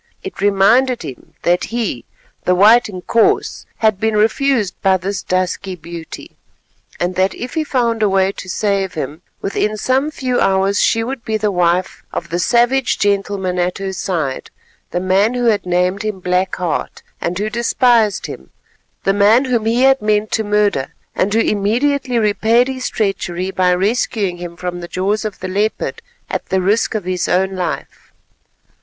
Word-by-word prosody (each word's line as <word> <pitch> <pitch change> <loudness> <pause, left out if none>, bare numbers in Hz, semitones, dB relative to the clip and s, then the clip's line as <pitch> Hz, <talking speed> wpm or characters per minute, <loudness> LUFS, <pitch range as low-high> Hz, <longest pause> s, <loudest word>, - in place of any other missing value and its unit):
It 390 - -7
reminded 230 +6 +3
him 130 - -10
that 175 +1 +2
he, 235 -1 -3 0.4
the 180 - +3
white 215 +5 +6
Inkoos, 205 +4 0
had 215 -3 +2
been 220 0 +1
refused 220 -1 +2
by 190 -1 +3
this 195 +2 -3
dusky 185 +1 -2
beauty, 170 -1 -10 0.6
and 175 +1 0
that 190 +1 +2
if 245 +1 -6
he 320 - 0
found 235 -6 0
a 210 - +3
way 190 0 +2
to 185 - -9
save 195 -1 -1
him, 155 +1 -5 0.2
within 210 +2 -1
some 260 +7 +1
few 255 -5 -1
hours 195 +1 +2
she 225 -1 +2
would 250 +1 -5
be 220 -1 -1
the 210 -1 0
wife 180 0 0
of 170 - -5
the 175 - -1
savage 240 +6 +2
gentleman 195 -2 0
at 180 +1 0
her 195 0 -4
side, 165 -8 -3 0.4
the - - -2
man 195 +6 +2
who 245 -1 0
had 210 -5 +2
named 180 +2 +1
him 215 -3 -3
Black 180 +1 0
Heart 175 -3 -3 0.2
and 170 +1 -2
who 210 +2 -2
despised 235 -2 +2
him, - - -8 0.5
the 195 - +2
man 210 +6 +4
whom 235 -4 0
he 235 +3 +2
had 270 0 +4
meant 210 0 +1
to 220 - 0
murder 205 -9 0 0.2
and 195 - 0
who 220 - +2
immediately 245 +6 +1
repaid 220 +3 +3
his 260 -1 -3
treachery 190 -3 -2
by 185 -1 +2
rescuing 200 -1 0
him 175 -1 -8
from 175 +1 -4
the 175 - -6
jaws 200 +5 -1
of 210 -3 -5
the 185 - -3
leopard 205 +4 -2 0.3
at - - -4
the 190 - +1
risk 205 +5 +1
of 215 - -1
his 180 0 -2
own 190 +1 +1
life. 180 -1 -5
200 Hz, 175 wpm, -17 LUFS, 185-225 Hz, 0.6 s, white